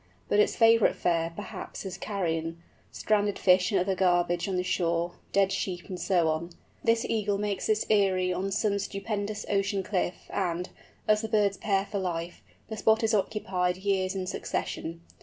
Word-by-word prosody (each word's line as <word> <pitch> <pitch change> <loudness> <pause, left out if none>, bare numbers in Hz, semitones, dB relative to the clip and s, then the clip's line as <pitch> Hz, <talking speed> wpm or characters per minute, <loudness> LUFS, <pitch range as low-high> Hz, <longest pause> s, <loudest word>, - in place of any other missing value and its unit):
But 205 - +3
its 210 - +3
favourite 225 -1 +5
fare, 165 -1 0
perhaps, 205 - -7
is 190 -1 -4
carrion—stranded 190 +3 -2
fish 180 +2 +4
and 195 - +3
other 190 +2 +1
garbage 175 -1 +2
on 190 - -1
the 180 - 0
shore, 170 -1 0 0.2
dead 195 -1 +3
sheep, 180 -2 -3
and 180 -2 -5
so 175 -4 +2
on. 160 +2 -1 0.3
This 230 0 +2
Eagle 210 -2 0
makes 205 -1 -2
its 215 0 +2
eyrie 190 -3 +2
on 190 +2 -2
some 200 0 +1
stupendous 205 +1 -3
ocean 195 -1 0
cliff, 185 -2 -2
and, 180 -1 -1 0.4
as 215 0 +4
the 220 - -3
birds 205 -3 +2
pair 195 -2 +1
for 200 0 -3
life, 175 -2 -4 0.3
the 220 - -6
spot 220 +2 +3
is 225 0 +2
occupied 185 -3 0
years 190 -1 0
in 190 -1 -2
succession. 165 -2 -4
195 Hz, 170 wpm, -28 LUFS, 180-205 Hz, 0.4 s, favourite